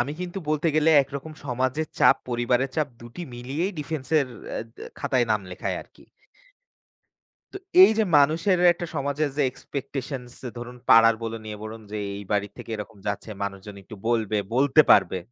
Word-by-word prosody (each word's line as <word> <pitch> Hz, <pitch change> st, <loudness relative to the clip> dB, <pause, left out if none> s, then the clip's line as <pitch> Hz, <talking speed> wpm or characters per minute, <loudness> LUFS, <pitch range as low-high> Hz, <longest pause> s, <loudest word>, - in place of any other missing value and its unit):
আমি 135 Hz, +4 st, -1 dB
কিন্তু 180 Hz, +1 st, -4 dB
বলতে 155 Hz, +2 st, +1 dB
গেলে 155 Hz, +1 st, +4 dB
একরকম 140 Hz, +3 st, -7 dB
সমাজের 130 Hz, +4 st, -1 dB
চাপ, -, -, +6 dB
পরিবারের 120 Hz, +2 st, +1 dB
চাপ 155 Hz, -2 st, +1 dB
২টি 120 Hz, +9 st, -9 dB
মিলিয়েই 140 Hz, +11 st, -3 dB
ডিফেন্সের 150 Hz, -1 st, 0 dB, 0.2 s
অ্যা -, -, -3 dB, 0.2 s
দ্যা -, -, -9 dB
খাতায় 125 Hz, -2 st, +1 dB
নাম 105 Hz, -2 st, +2 dB
লেখায় 90 Hz, -, -3 dB
আরকি। -, -, -22 dB, 1.5 s
তো -, -, -7 dB, 0.3 s
এই 375 Hz, -, +9 dB
যে 220 Hz, -, +4 dB
মানুষের 165 Hz, +6 st, +3 dB
একটা 175 Hz, 0 st, -6 dB
সমাজের 145 Hz, +1 st, -1 dB
যে 145 Hz, -, +2 dB
এক্সপেকটেশনস, 130 Hz, -2 st, -6 dB, 0.2 s
ধরুন 120 Hz, +1 st, -7 dB
পাড়ার 115 Hz, 0 st, +8 dB
বলুন, 115 Hz, -1 st, -5 dB
ইয়ে 105 Hz, -, -6 dB
বলুন, 110 Hz, +1 st, -8 dB
যে 105 Hz, -, -3 dB, 0.2 s
এই 100 Hz, 0 st, -7 dB
বাড়ি 105 Hz, 0 st, +1 dB
থেকে -, -, -10 dB
এরকম 105 Hz, 0 st, -8 dB
যাচ্ছে 100 Hz, +2 st, -3 dB
মানুষজন 100 Hz, +1 st, -5 dB
একটু 110 Hz, +3 st, -11 dB
বলবে, 110 Hz, -3 st, +1 dB, 0.2 s
বলতে 140 Hz, +3 st, +5 dB
পারবে, 95 Hz, -1 st, +5 dB
130 Hz, 165 wpm, -25 LUFS, 115-150 Hz, 1.5 s, এই